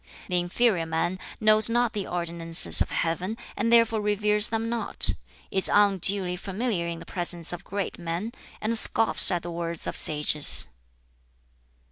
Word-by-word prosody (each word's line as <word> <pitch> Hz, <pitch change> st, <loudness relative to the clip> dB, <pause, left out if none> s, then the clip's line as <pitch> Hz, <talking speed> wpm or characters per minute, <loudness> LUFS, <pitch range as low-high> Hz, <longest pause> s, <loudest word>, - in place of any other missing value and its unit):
The 180 Hz, -1 st, 0 dB
inferior 175 Hz, -1 st, 0 dB
man 165 Hz, +3 st, -3 dB, 0.2 s
knows 215 Hz, 0 st, +4 dB
not 240 Hz, 0 st, 0 dB
the 205 Hz, -3 st, -5 dB
ordinances 170 Hz, -1 st, +2 dB
of -, -, 0 dB
Heaven 180 Hz, +6 st, -3 dB, 0.2 s
and 230 Hz, +3 st, -2 dB
therefore 230 Hz, -2 st, +3 dB
reveres 210 Hz, 0 st, +1 dB
them 225 Hz, 0 st, -3 dB
not, 235 Hz, 0 st, +2 dB, 0.4 s
is 190 Hz, -, -1 dB
unduly 195 Hz, -2 st, +3 dB
familiar 195 Hz, -1 st, -4 dB
in 170 Hz, 0 st, -5 dB
the 165 Hz, -, -12 dB
presence 175 Hz, -2 st, -4 dB
of 175 Hz, +2 st, -8 dB
great 200 Hz, 0 st, -6 dB
men, 175 Hz, +6 st, -5 dB, 0.3 s
and 220 Hz, +2 st, -2 dB
scoffs 225 Hz, 0 st, +4 dB
at 175 Hz, -2 st, -1 dB
the 175 Hz, -, -7 dB
words 170 Hz, -1 st, -4 dB
of -, -, -5 dB
sages." 150 Hz, -1 st, +2 dB
190 Hz, 150 wpm, -25 LUFS, 170-215 Hz, 0.4 s, knows